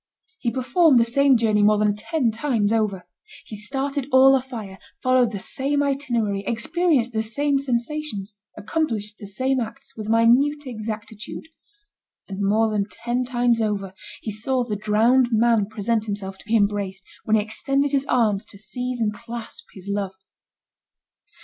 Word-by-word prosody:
He 240 - 0
performed 260 +3 +3
the 230 - +4
same 270 +2 +4
journey 215 -2 +2
more 210 +1 +5
than 210 -1 +2
ten 250 +2 0
times 225 -3 0
over. 200 -5 -1 0.4
He 215 - -8
started 270 +5 -2
all 265 +1 +7
afire, 235 -7 -5 0.2
followed 255 -2 +3
the 205 - -4
same 285 +7 -1
itinerary, 240 -8 -1
experienced 260 0 +1
the 220 - +1
same 280 +6 0
sensations, 245 -5 -3 0.2
accomplished 220 -5 -2
the 205 - -8
same 260 +6 0
acts, 225 -2 -6
with 215 -1 -6
minute 255 +6 +3
exactitude; 220 +2 -6 0.8
and 195 0 -5
more 215 +3 +2
than 205 -1 0
ten 240 +3 -2
times 240 -2 +1
over, 200 -3 -2 0.3
he 220 - -3
saw 250 +5 -1
the 220 -3 -3
drowned 220 +5 +3
man 225 -2 +3
present 215 +1 -1
himself 195 -2 -5
to - - -15
be 225 - +2
embraced, 200 -2 -1 0.2
when 220 - +3
he 215 - +3
extended 275 +6 0
his 280 0 0
arms 215 -6 +2
to 200 - -10
seize 245 +5 -4
and 215 -2 0
clasp 230 +1 -8
his 190 0 -10
love. 200 -1 -2
230 Hz, 155 wpm, -23 LUFS, 210-260 Hz, 0.8 s, all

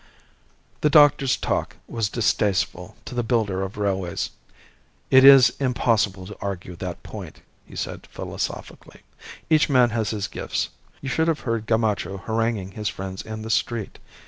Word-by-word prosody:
The 150 - +3
doctor's 145 -3 +5
talk - - -2
was 115 -3 -2
distasteful 100 -5 0
to - - -7
the 120 - 0
builder 110 -5 0
of 95 +1 -5
railways. 95 -4 -2 0.8
"It 130 0 +8
is 135 -3 +9
impossible 115 -7 +1
to 105 +1 -10
argue 95 -2 -5
that 90 -1 -6
point," - - -9 0.3
he - - -13
said, - - -5
philosophically. - - -6 0.5
"Each 155 -1 +3
man 125 -4 +4
has 110 -3 -1
his 105 -2 -2
gifts. - - -3 0.3
You 135 - -4
should 160 +5 +1
have 165 -2 0
heard 115 -2 -2
Gamacho 105 -4 0
haranguing 110 -4 -1
his 105 +1 -3
friends 95 0 -6
in 110 0 -7
the 110 - -4
street. 115 -3 -1
110 Hz, 150 wpm, -24 LUFS, 95-125 Hz, 0.8 s, is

